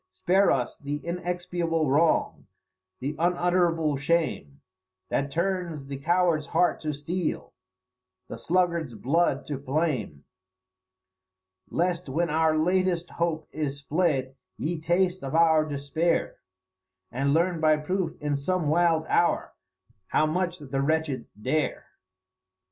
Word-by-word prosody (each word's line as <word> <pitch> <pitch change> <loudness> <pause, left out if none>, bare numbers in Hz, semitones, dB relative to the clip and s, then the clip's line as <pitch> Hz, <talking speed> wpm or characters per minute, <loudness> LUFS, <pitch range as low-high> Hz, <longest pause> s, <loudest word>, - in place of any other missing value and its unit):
Spare 195 - +2
us 125 -2 0
the 145 0 -3
inexpiable 175 -2 -1
wrong, 155 +5 +2 0.5
the 140 +4 -3
unutterable 175 -3 +2
shame, 140 - -1 0.5
That 140 +1 0
turns 170 -2 -2
the 140 0 -6
coward's 170 0 +1
heart 180 - +2
to 155 - -2
steel, 155 +4 -3 0.7
the - - -8
sluggard's 170 -3 0
blood 140 +4 +1
to 145 -3 -4
flame; 135 - -2 1.5
Lest 175 -2 -1
when 165 +4 0
our 160 0 +2
latest 180 +1 +1
hope 165 -2 -2
is 145 -2 -3
fled 140 -3 0 0.2
ye 165 +3 -2
taste 180 +2 +1
of 135 +3 -3
our 160 -2 +5
despair, 150 +3 -1 0.7
And 135 +3 0
learn 170 +2 +2
by 155 -1 +4
proof 170 +2 -2
in 150 -1 -1
some 160 +2 0
wild 165 0 +3
hour, 170 - +1 0.5
how 155 - +2
much 175 +3 -1
the 135 -3 -3
wretched 155 -1 -1
dare." 140 +8 -1
160 Hz, 120 wpm, -26 LUFS, 145-175 Hz, 1.5 s, our